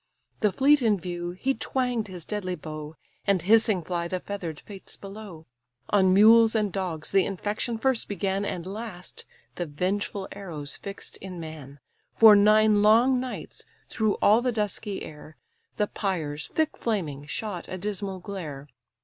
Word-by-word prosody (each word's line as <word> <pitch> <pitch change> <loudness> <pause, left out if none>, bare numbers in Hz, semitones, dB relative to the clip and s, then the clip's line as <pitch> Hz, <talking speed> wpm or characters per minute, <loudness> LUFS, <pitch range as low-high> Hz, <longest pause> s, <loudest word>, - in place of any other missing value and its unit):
The 210 -3 +2
fleet 280 +8 +4
in 215 -5 +2
view, 175 0 -4
he 220 +10 -1
twang'd 250 -5 -1
his 180 -4 -9
deadly 190 -4 -3
bow, 155 -1 -8 0.3
And 195 -4 +2
hissing 215 -2 +4
fly 170 0 -2
the 185 +1 -2
feather'd 175 -6 -5
fates 195 -2 -9
below. 195 -5 -10 0.5
On 190 -2 +4
mules 225 +3 +7
and 210 -4 +1
dogs 175 -5 -3
the 195 -1 +4
infection 210 +4 -3
first 260 +1 +1
began; 195 0 -1
And 175 -4 -4
last, 195 -2 -8 0.3
the 175 - -2
vengeful 190 +5 -2
arrows 160 -8 -5
fix'd 200 0 -8
in 185 -2 -7
man. 150 -3 -9 0.4
For 220 -2 +9
nine 215 0 +5
long 235 +5 +5
nights, 255 0 -6 0.3
through 220 -2 +1
all 215 +3 +6
the 250 0 +1
dusky 210 -2 -2
air, 155 0 -11 0.4
The 210 - +2
pyres, 160 -9 -3
thick 315 -1 -1
flaming, 155 -11 -2
shot 185 +2 -4
a 185 - -5
dismal 200 0 -4
glare. 155 -8 -7
195 Hz, 155 wpm, -26 LUFS, 175-215 Hz, 0.5 s, For